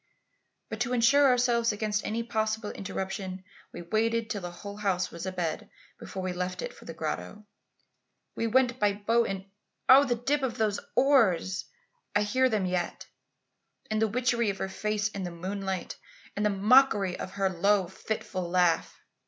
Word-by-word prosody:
"But - - -6
to 245 +1 -1
ensure 270 +4 +5
ourselves 240 -2 +3
against 210 0 -1
any 230 +2 -2
possible 220 -1 -1
interruption, 190 -1 -5 0.3
we 175 - -8
waited 225 +4 0
till 205 -3 -3
the 175 - -5
whole 200 +4 -9
house 190 -3 0
was 170 +2 -6
abed 175 -4 -3 0.3
before 190 - -6
we 185 -1 -2
left 180 - -3
it - - -5
for - - -15
the - - -7
grotto. 210 0 -5 0.9
We 230 - -1
went 255 +1 +2
by 205 -1 +3
boat 230 +3 +1
and 195 -1 -4 0.4
oh! 265 +2 +9
the 245 -3 +1
dip 275 +5 0
of 260 -4 -2
those 215 -2 +1 0.2
oars! 210 -10 +3 0.5
I 205 - +4
hear 255 +5 +2
them 215 -5 0
yet. 180 -1 -2 0.9
And 215 0 +1
the 220 - +4
witchery 235 0 +1
of 195 - -2
her 190 - -3
face 210 +1 -1
in 200 -2 -6
the 180 - -3
moonlight; 190 +2 -4 0.4
and 205 - -1
the 210 - +3
mockery 205 -2 +4
of 185 - -6
her 195 -1 +1
low 195 +2 +2
fitful 190 -1 -4
laugh! 175 -2 +1
210 Hz, 170 wpm, -28 LUFS, 190-230 Hz, 0.9 s, oh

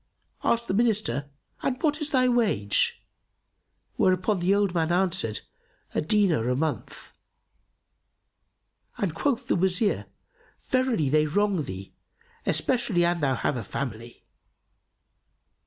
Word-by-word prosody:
Asked 235 0 +1
the - - -1
Minister, 200 - +1 0.3
"And 255 -1 -1
what 305 0 +1
is 300 - -1
thy 255 -3 +3
wage?" 210 - +1 0.9
whereto 185 +3 +3
the 185 +1 +2
old 200 -3 +1
man 165 -1 +1
answered, 175 - +1 0.5
"A - - +1
dinar 160 - +2
a 125 - +1
month," 155 +2 -4 1.8
and 190 -6 -1
quoth 250 - -1
the - - +2
Wazir, 190 +3 +1 0.5
"Verily 255 - +1
they 155 +2 +3
wrong 200 +2 +1
thee, 95 -7 -7 0.5
especially 235 -9 +1
an 175 0 +1
thou 135 -4 +1
have 130 - -1
a 115 - -4
family." 120 +1 -6
185 Hz, 120 wpm, -26 LUFS, 145-225 Hz, 1.8 s, thy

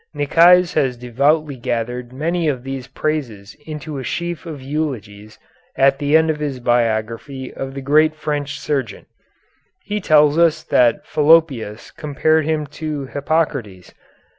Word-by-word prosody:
Nicaise 170 +5 +5
has 130 -5 0
devoutly 140 +4 0
gathered 120 0 -3
many 165 +5 -1
of 130 -5 -1
these 135 -1 -6
praises 125 -8 -4
into 150 -2 -6
a - - -6
sheaf 170 +5 -4
of 155 -3 -7
eulogies 120 -8 -5 0.4
at 135 0 +3
the 145 +1 +4
end 160 0 +2
of 150 - -5
his 145 -4 -3
biography 120 +2 -1
of 135 0 -6
the 135 - -5
great 155 +3 +3
French 150 -2 -3
surgeon. 135 -9 -3 0.8
He 210 +1 -3
tells 150 -2 +4
us 165 -1 +3
that 125 +4 +2
Fallopius 145 -8 +2
compared 155 +1 0
him 155 -1 -1 0.2
to 150 -3 -3
Hippocrates. 135 - -2
145 Hz, 140 wpm, -19 LUFS, 125-155 Hz, 0.8 s, Nicaise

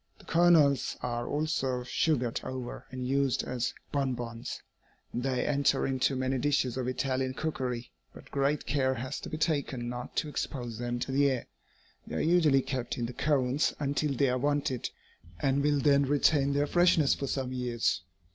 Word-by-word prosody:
The - - -18
kernels 165 -6 +4
are 120 -1 -2
also 140 -5 -1
sugared 125 -2 0
over 130 -2 -6
and 130 -1 -4
used 135 -1 +1
as 125 -1 -2 0.2
bonbons. 120 -4 -3 0.5
They 125 +1 -1
enter 140 -1 +2
into 135 0 +1
many 130 0 0
dishes 130 -3 +1
of 130 -1 -2
Italian 130 0 -1
cookery, 125 -6 -3 0.2
but - - -14
great 140 +1 0
care 130 -2 +1
has 130 +3 -4
to - - -7
be 155 - -4
taken 140 -7 -1
not 125 0 -6
to - - 0
expose 120 -6 -4
them 120 0 -2
to 120 - -3
the 140 +1 +4
air. 130 -3 -2 0.6
They 75 - -5
are - - 0
usually 155 -5 +4
kept 125 -3 -3
in 120 - -1
the 120 - -5
cones 135 0 +1
until 145 0 0
they 135 +1 +3
are 125 0 0
wanted, 145 -2 0 0.5
and 135 +1 +2
will 145 0 +2
then 140 -1 +4
retain 140 0 +3
their 145 +1 +2
freshness 170 -2 +4
for 140 - -3
some 130 -1 -2
years. 120 -7 0
135 Hz, 170 wpm, -30 LUFS, 125-145 Hz, 0.6 s, kernels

